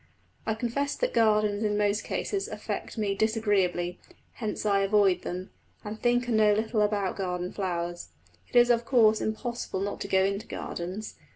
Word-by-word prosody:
I 220 - +1
confess 255 +5 -1
that - - -1
gardens 215 -2 +3
in 210 -1 +1
most 210 0 +1
cases 395 0 -2
affect 480 - -5
me 205 -2 0
disagreeably; 195 -5 +1 0.3
hence 215 -2 -4
I 200 -1 +3
avoid 195 -2 +3
them, 180 +2 -5 0.3
and 215 +1 -6
think 245 0 +2
and 230 -3 +2
know 210 -1 +5
little 220 +1 0
about 205 -2 +1
garden 180 -2 -2
flowers. 175 - -3 0.4
It - - -15
is 240 0 +7
of 235 0 +2
course 225 -3 +4
impossible 220 -3 -3
not 200 +1 -3
to - - -3
go 190 -1 +3
into 200 +3 -2
gardens. 185 +5 -5
210 Hz, 170 wpm, -28 LUFS, 195-225 Hz, 0.4 s, is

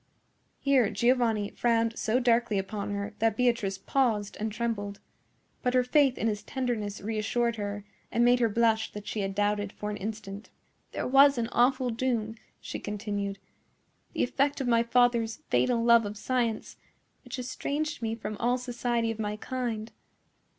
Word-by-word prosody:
Here 265 -6 +3
Giovanni 225 -1 +1
frowned 230 -1 +1
so 225 +3 +1
darkly 235 -3 +2
upon 200 +2 -3
her 200 +1 -3
that 225 -1 +2
Beatrice 235 -6 +1
paused 220 -5 0
and 215 +1 -2
trembled. 210 -3 -3 0.6
But 250 0 0
her 250 - +5
faith 270 0 +3
in - - -2
his 210 -2 0
tenderness 235 -6 -3
reassured 225 +2 -1
her, 205 -1 -4 0.3
and 235 +1 +3
made 245 0 +5
her 230 -2 +3
blush 220 0 +2
that 210 0 -7
she 215 - -4
had 195 -1 -2
doubted 205 0 0
for 210 0 -5
an 205 - -4
instant. 205 0 -6 0.4
"There - - -3
was 275 +1 +6
an 230 -1 -1
awful 255 0 +2
doom," 225 -2 -1 0.3
she - - -6
continued, 205 -1 -3 0.8
"the - - 0
effect 280 +3 +1
of 265 - -2
my 230 -1 +4
father's 235 -1 +2 0.2
fatal 240 -2 +2
love 235 -2 +5
of 205 +1 -7
science, 235 -1 -1 0.5
which - - -7
estranged 285 +4 -3
me 225 -1 -1
from 215 -2 -6
all 245 +4 +1
society 240 -2 -1
of 225 - -7
my 210 -1 -2
kind. 235 -2 -4
230 Hz, 165 wpm, -28 LUFS, 210-245 Hz, 0.8 s, was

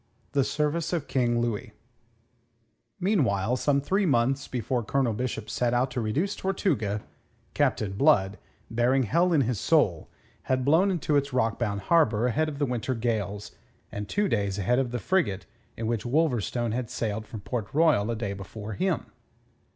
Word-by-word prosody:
THE 140 -2 +2
SERVICE 150 +4 -1
OF 165 -5 -2
KING 120 -2 +1
LOUIS 120 -1 -2 1.3
Meanwhile, 125 - +1
some 140 +1 +2
three 190 +7 +1
months 135 0 +1
before 120 0 -2
Colonel 125 +1 +1
Bishop 110 -1 -3
set 120 +2 0
out 130 +2 +1
to 125 - -2
reduce 160 - -1
Tortuga, 120 - -1 0.5
Captain 105 -3 +1
Blood, 105 -5 +3 0.3
bearing 125 +3 +2
hell 170 - +2
in 155 -4 +4
his 120 -4 -1
soul, - - +2 0.4
had 130 -1 +1
blown 165 +7 +4
into 155 -5 +1
its 140 -1 -1
rockbound 115 -4 0
harbour 120 - +3
ahead 155 +6 +1
of 145 - -7
the 145 - +1
winter 125 0 -2
gales, 105 -4 -2 0.4
and 105 0 -5
two 205 0 +1
days 100 - 0
ahead 120 +6 +2
of 130 -2 0
the 125 - -3
frigate 120 - 0 0.3
in 115 - -3
which 115 -1 -1
Wolverstone 120 -4 0
had 120 0 -3
sailed 110 -1 -3
from 110 - -8
Port 110 0 -4
Royal 150 -9 +3
a 115 - 0
day 105 -3 -3
before 105 +2 -7
him. 180 - -1
125 Hz, 165 wpm, -27 LUFS, 110-145 Hz, 1.3 s, in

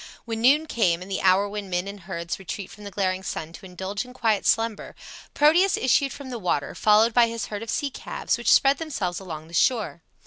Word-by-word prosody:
When 225 -1 -4
noon 285 +6 +5
came 180 - +1
and 195 - -11
the 190 - -2
hour 190 +2 +4
when 205 -1 -6
men 180 +1 -1
and 200 0 -7
herds 170 -2 -5
retreat 190 +1 -6
from 210 - -12
the - - -5
glaring 185 -2 -1
sun 165 -3 -5
to 190 - -11
indulge 190 +3 -4
in 250 0 -13
quiet 225 -5 0
slumber, 225 -1 0 0.4
Proteus 340 +6 +4
issued 265 +2 +2
from 275 -2 -9
the 240 - -5
water, 175 -7 -1
followed 215 +2 +4
by 240 0 +5
his 230 -2 -4
herd 205 - -4
of 230 - -7
sea 285 +3 -1
calves - - -3
which - - +1
spread 275 0 +5
themselves 200 - -3
along 160 -5 -8
the 170 - -16
shore. 215 -2 +1
205 Hz, 220 wpm, -24 LUFS, 185-245 Hz, 0.4 s, noon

